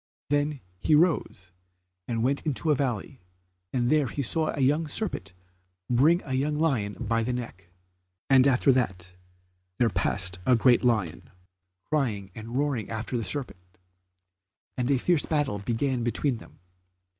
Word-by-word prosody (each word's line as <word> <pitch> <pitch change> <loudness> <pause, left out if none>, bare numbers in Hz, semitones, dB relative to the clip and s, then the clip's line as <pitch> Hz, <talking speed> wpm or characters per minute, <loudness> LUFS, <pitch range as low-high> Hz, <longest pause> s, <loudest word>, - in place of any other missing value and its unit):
Then 145 -1 0 0.2
he 155 - +3
rose 150 - +1 0.6
and 115 -1 -1
went 140 +3 +1
into 155 +1 -1
a - - +4
valley, 130 -1 -3 0.5
and 120 -2 0
there 150 -3 +3
he 140 +5 -3
saw 155 +6 0
a - - -4
young 150 +4 +2
serpent 140 - -3 0.6
bring 155 +9 +4
a 135 - -5
young 145 +3 0
lion 135 -10 0
by 115 -1 0
the 120 +3 -1
neck, 95 -8 -7 0.6
and 135 0 +6
after 135 +1 +4
that 90 -8 -1 0.6
there 115 -3 +2
passed 90 0 +1
a 125 - +4
great 120 +1 +4
lion, 110 -9 0 0.6
crying 110 -11 -1
and 115 +3 -6
roaring 140 -6 -1
after 115 +3 -4
the 115 - -1
serpent, 90 -10 -6 1.0
and 125 0 -1
a 140 - +3
fierce 165 +4 +1
battle 145 -9 0
began 120 +4 -1
between 120 +2 0
them. - - -15
125 Hz, 150 wpm, -27 LUFS, 110-145 Hz, 1.0 s, and